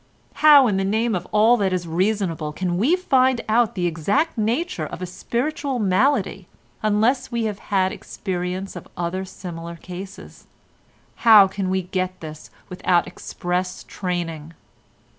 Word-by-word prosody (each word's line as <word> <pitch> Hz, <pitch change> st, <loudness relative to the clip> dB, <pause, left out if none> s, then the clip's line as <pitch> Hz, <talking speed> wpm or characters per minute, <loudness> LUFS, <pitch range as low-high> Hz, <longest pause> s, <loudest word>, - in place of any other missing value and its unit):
How 295 Hz, -3 st, +8 dB
in 205 Hz, -5 st, +1 dB
the 195 Hz, -, 0 dB
name 220 Hz, +4 st, 0 dB
of 180 Hz, -1 st, -3 dB
all 220 Hz, +3 st, +5 dB
that 195 Hz, -3 st, 0 dB
is 180 Hz, -1 st, -1 dB
reasonable 170 Hz, -3 st, -1 dB
can 175 Hz, +1 st, -2 dB
we 280 Hz, -, +3 dB
find 260 Hz, -8 st, +2 dB
out 225 Hz, +1 st, +2 dB
the 180 Hz, -2 st, -1 dB
exact 195 Hz, -, 0 dB
nature 225 Hz, -, -1 dB
of -, -, -8 dB
a 185 Hz, -, -4 dB
spiritual 270 Hz, -, -3 dB
malady, 215 Hz, +7 st, +1 dB, 0.3 s
unless 220 Hz, +5 st, +1 dB
we 235 Hz, -1 st, -1 dB
have 210 Hz, -2 st, -3 dB
had 190 Hz, -2 st, +2 dB
experience 185 Hz, 0 st, -5 dB
of 175 Hz, -, -9 dB
other 175 Hz, +2 st, -2 dB
similar 170 Hz, -2 st, -8 dB
cases? 180 Hz, +3 st, -10 dB, 0.7 s
How 215 Hz, -4 st, +7 dB
can 190 Hz, 0 st, -3 dB
we 190 Hz, 0 st, 0 dB
get 185 Hz, 0 st, -3 dB
this 155 Hz, -1 st, -9 dB, 0.2 s
without 180 Hz, -1 st, +1 dB
express 180 Hz, 0 st, -4 dB
training? 165 Hz, -4 st, -4 dB
190 Hz, 145 wpm, -22 LUFS, 180-230 Hz, 0.7 s, How